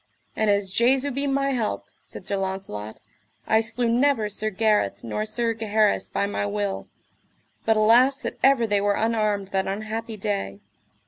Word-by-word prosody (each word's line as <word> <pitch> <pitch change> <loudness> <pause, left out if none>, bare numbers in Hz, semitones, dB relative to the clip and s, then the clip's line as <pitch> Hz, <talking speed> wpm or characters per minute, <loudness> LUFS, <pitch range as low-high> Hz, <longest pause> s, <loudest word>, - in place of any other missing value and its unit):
And 220 -1 +1
as 200 -2 +1
Jesu 260 +6 +3
be 280 +2 -2
my 275 0 +1
help, 235 -5 -2 0.2
said - - -11
Sir 200 - -1
Launcelot, 190 - -5 0.5
I 220 0 +3
slew 225 +2 0
never 235 -2 +2
Sir 215 +2 -1
Gareth 210 - +1
nor 210 - -3
Sir 230 +1 0
Gaheris 215 -1 +1
by - - -1
my 205 0 -2
will; 205 -1 -3 0.8
but 225 -1 +3
alas 245 +6 +4
that - - -4
ever 270 -3 +4
they 205 -2 +1
were 205 0 +1
unarmed 215 -3 0
that 190 -1 -1
unhappy 215 +3 -4
day. 195 - -3
215 Hz, 160 wpm, -24 LUFS, 200-230 Hz, 0.8 s, alas